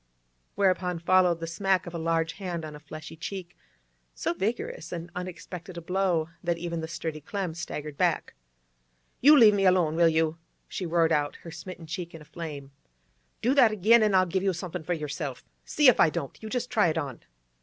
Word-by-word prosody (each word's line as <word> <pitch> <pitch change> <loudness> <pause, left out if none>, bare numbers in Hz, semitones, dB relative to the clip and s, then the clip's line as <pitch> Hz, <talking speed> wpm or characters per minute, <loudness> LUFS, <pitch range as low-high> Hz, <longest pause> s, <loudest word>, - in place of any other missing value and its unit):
Whereupon 185 -3 +1
followed 175 0 +3
the - - -2
smack 190 +3 0
of 175 - -8
a 170 - -3
large 165 0 0
hand 175 -4 -4
on 155 -1 -8
a - - -10
fleshy 155 +1 -9
cheek, 180 +1 -7 0.6
so - - -1
vigorous 190 -4 -3
and 170 0 -6
unexpected 180 -1 -7
a - - -5
blow 180 -2 0 0.2
that 170 -1 0
even 170 -1 -4
the 160 - -4
sturdy 160 -2 -5
Clem 185 +2 -3
staggered 150 -3 -6
back. - - +1 0.9
'You 295 +3 +8
leave 220 -5 +8
me 200 -1 +1
alone, 175 -4 +3
will 170 0 +5
you?' 160 0 +1 0.3
she 185 - -4
roared 165 -1 +2
out, 145 -1 +1
her 165 - -8
smitten 175 0 -9
cheek 165 +1 -6
in 160 - -10
a - - -18
flame. 150 -4 -7 0.7
'Do 250 +4 +3
that 255 -6 +6
again, 215 +3 +5
an' 210 -2 +3
I'll 185 0 +5
give 185 +2 -1
you 195 -1 +1
somethin' 180 0 -5
for 170 +3 -2
yerself! 150 -4 -5 0.2
See 295 -2 +3
if 250 - +6
I - - +6
don't! 140 -3 -5
You 220 - -6
just 250 +1 -3
try 215 -7 +4
it 160 0 0
on! 140 -6 -3
170 Hz, 200 wpm, -27 LUFS, 160-190 Hz, 0.9 s, You